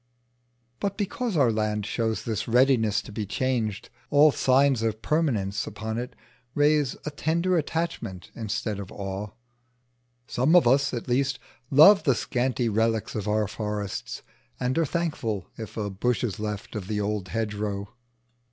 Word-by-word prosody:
But 200 -1 -2
because 210 0 -2
our 130 -5 +4
land 105 -1 -1
shows 110 0 -1
this 110 -2 -2
readiness 115 -4 +3
to - - -10
be 105 -1 -4
changed, 115 -3 -2 0.2
all 150 +1 +6
signs 135 -2 +3
of 110 -1 -2
permanence 115 -10 0
upon 110 +2 -4
it 125 - -6 0.4
raise 145 -2 +3
a 150 - -3
tender 170 +5 0
attachment 155 - -3
instead 110 -2 -3
of 100 0 -7
awe: 100 +1 -5 1.0
some 130 +9 +2
of 175 -8 +6
us, 135 +2 +3
at 120 -3 -4
least, 135 +1 +1 0.3
love 160 +8 +8
the 135 -5 +2
scanty 125 0 -1
relics 110 0 0
of 105 -1 -3
our 105 0 +1
forests, 105 -2 -4 0.4
and 125 +1 0
are 165 - +2
thankful 125 - -2
if 110 -2 -8
a 105 -2 -2
bush 120 +6 0
is 110 -5 -2
left 105 +1 -5
of 100 -4 -4
the 105 -1 -1
old 105 -2 -2
hedgerow. 105 -1 -3
115 Hz, 150 wpm, -26 LUFS, 105-140 Hz, 1.0 s, love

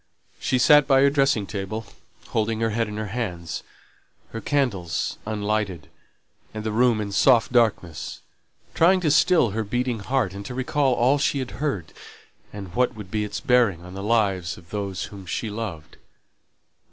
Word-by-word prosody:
She 130 - +1
sate 150 +3 +6
by 135 -1 +5
her 140 0 +5
dressing 135 -7 +2
table, 100 +2 -5 0.4
holding 110 0 0
her 115 -1 +1
head 115 +1 0
in 105 0 -6
her 110 -1 -4
hands, 90 -9 -4 0.7
her 115 - -5
candles 105 - -1
unlighted, 105 -6 -2 0.7
and 110 - -4
the 110 - -2
room 120 0 +3
in 105 -1 -3
soft 115 +4 +4
darkness, 105 -9 0 0.5
trying 185 +3 +4
to 155 -4 +2
still 160 - +4
her 110 +2 -2
beating 120 +2 -1
heart, 115 -2 -1
and 100 +1 -7
to 125 - -6
recall 130 0 +1
all 130 +5 +3
she 140 - +1
had 130 -2 -4
heard, 100 - -2 0.6
and 100 -3 -8
what 125 +1 +1
would 105 -4 -10
be 105 -1 0
its 105 0 -4
bearing 110 -8 +2
on 90 - -10
the 100 - -6
lives 100 -5 0
of 85 -2 -17
those 100 -3 -3
whom 100 -3 -9
she 110 +6 -3
loved. 90 -8 -6
110 Hz, 170 wpm, -24 LUFS, 100-125 Hz, 0.7 s, sate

